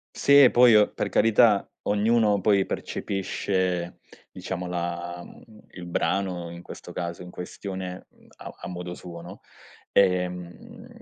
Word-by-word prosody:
Sì 140 Hz, 0 st, +6 dB
e 130 Hz, -, +7 dB
poi 120 Hz, -1 st, +6 dB
o 105 Hz, -1 st, +5 dB
per -, -, -3 dB
carità 110 Hz, -1 st, +4 dB
ognuno 105 Hz, 0 st, +2 dB
poi 100 Hz, -1 st, +3 dB
percepisce, 95 Hz, -2 st, -2 dB, 0.3 s
diciamo, 90 Hz, 0 st, -5 dB
la 85 Hz, 0 st, -4 dB
mhmm, -, -, -15 dB, 0.3 s
il 90 Hz, -1 st, -9 dB
brano 90 Hz, 0 st, -1 dB
in 85 Hz, 0 st, -10 dB
questo -, -, -10 dB
caso 85 Hz, 0 st, -5 dB
in 90 Hz, -, -10 dB
questione 95 Hz, 0 st, -7 dB, 0.3 s
a -, -, -9 dB
a -, -, -7 dB
modo 90 Hz, 0 st, -6 dB
suo, 85 Hz, -2 st, -10 dB
no? 90 Hz, +3 st, -11 dB, 0.5 s
Ehm, 90 Hz, -2 st, -1 dB
90 Hz, 135 wpm, -25 LUFS, 90-100 Hz, 0.5 s, e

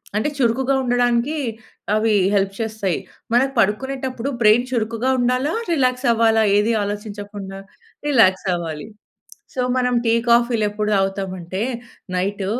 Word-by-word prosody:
అంటే 220 Hz, +8 st, +1 dB
చురుకుగా 260 Hz, +2 st, +1 dB
ఉండడానికి 245 Hz, +4 st, +1 dB, 0.6 s
అవి 220 Hz, 0 st, +2 dB, 0.2 s
హెల్ప్ 195 Hz, -1 st, +1 dB
చేస్తాయి. 220 Hz, -5 st, -2 dB, 0.4 s
మనం 250 Hz, +3 st, +4 dB
పడుకునేటప్పుడు 260 Hz, +4 st, -1 dB
బ్రైన్ 215 Hz, +2 st, +5 dB
చురుకుగా 230 Hz, +1 st, -1 dB
ఉండాలా? 255 Hz, +5 st, +1 dB, 0.2 s
రిలాక్స్ 255 Hz, -3 st, +1 dB
అవ్వాలా? 225 Hz, -1 st, +3 dB
ఏది 215 Hz, +3 st, +2 dB
ఆలోచించకుండా? 205 Hz, -1 st, -6 dB, 0.5 s
రిలాక్స్ 195 Hz, -9 st, +4 dB
అవ్వాలి. 165 Hz, +1 st, -4 dB, 0.7 s
సో, 255 Hz, -, -2 dB, 0.2 s
మనం 250 Hz, -1 st, +1 dB
టీ 225 Hz, -, +3 dB, 0.2 s
కాఫీలు 235 Hz, -1 st, +3 dB
ఎప్పుడు 210 Hz, 0 st, -2 dB
తాగుతాము 195 Hz, -1 st, -1 dB
అంటే 180 Hz, +3 st, -5 dB, 0.5 s
నైట్, 195 Hz, +2 st, -1 dB
225 Hz, 120 wpm, -21 LUFS, 200-250 Hz, 0.7 s, బ్రైన్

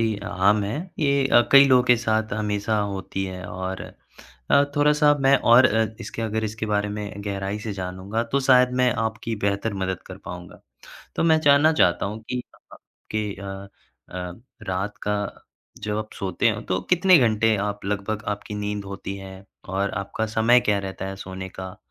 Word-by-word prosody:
ही 110 Hz, -2 st, +1 dB
आम 100 Hz, +1 st, +2 dB
है। 105 Hz, -, -3 dB, 0.2 s
ये 140 Hz, -3 st, +2 dB
अ, 120 Hz, -, +6 dB
कई 140 Hz, 0 st, +10 dB
लोगों 130 Hz, -1 st, +6 dB
के 125 Hz, -1 st, +5 dB
साथ 110 Hz, -2 st, -1 dB
हमेशा 105 Hz, +1 st, -1 dB
होती 95 Hz, -1 st, -3 dB
है 90 Hz, -1 st, -7 dB
और 95 Hz, +1 st, -5 dB, 0.7 s
अ, 140 Hz, -, +6 dB
थोड़ा-सा 150 Hz, 0 st, +4 dB
मैं 135 Hz, 0 st, +5 dB
और 120 Hz, +2 st, +6 dB
अ, 110 Hz, -1 st, +2 dB
इसके, -, -, -6 dB
अगर 110 Hz, 0 st, -2 dB
इसके 110 Hz, +1 st, -3 dB
बारे 105 Hz, -1 st, 0 dB
में 100 Hz, -1 st, -6 dB
गहराई 100 Hz, 0 st, -3 dB
से 105 Hz, -1 st, -5 dB
जानूँगा 95 Hz, +4 st, -3 dB
तो 140 Hz, -, +4 dB
शायद 125 Hz, -1 st, +6 dB
मैं 125 Hz, -, +4 dB
आपकी 115 Hz, +1 st, -3 dB
बेहतर 100 Hz, +2 st, -1 dB
मदद 95 Hz, -1 st, -3 dB
कर 95 Hz, 0 st, -9 dB
पाऊँगा। 90 Hz, 0 st, -9 dB, 0.6 s
तो -, -, +1 dB
मैं 160 Hz, -1 st, +4 dB
जानना 145 Hz, +1 st, +5 dB
चाहता 90 Hz, -, +2 dB
हूँ 110 Hz, +2 st, -6 dB
कि 125 Hz, -, -1 dB
अ -, -, -21 dB, 0.2 s
अ, -, -, -14 dB, 0.3 s
कि 105 Hz, -2 st, -2 dB
अ, 100 Hz, 0 st, -8 dB, 0.4 s
अ, 90 Hz, +1 st, -7 dB, 0.3 s
रात 95 Hz, +3 st, -2 dB
का 105 Hz, 0 st, 0 dB, 0.7 s
जब 105 Hz, 0 st, -2 dB
आप 110 Hz, 0 st, -6 dB
सोते 95 Hz, +4 st, 0 dB
हो 105 Hz, -1 st, -4 dB
तो 90 Hz, 0 st, 0 dB
कितने 180 Hz, +1 st, +6 dB
घंटे 110 Hz, -3 st, +3 dB
आप 105 Hz, -1 st, -4 dB
लगभग 105 Hz, +2 st, -2 dB
आपकी 105 Hz, +1 st, -10 dB
नींद 105 Hz, 0 st, -3 dB
होती 100 Hz, 0 st, -6 dB
है 95 Hz, -1 st, -9 dB, 0.3 s
और 100 Hz, +2 st, -1 dB
आपका 110 Hz, +3 st, -3 dB
समय 120 Hz, +3 st, +5 dB
क्या 105 Hz, -1 st, +3 dB
रहता 95 Hz, -1 st, -5 dB
है 95 Hz, -, -6 dB
सोने 95 Hz, 0 st, -7 dB
का? 95 Hz, +1 st, -8 dB
105 Hz, 185 wpm, -24 LUFS, 95-115 Hz, 0.7 s, कई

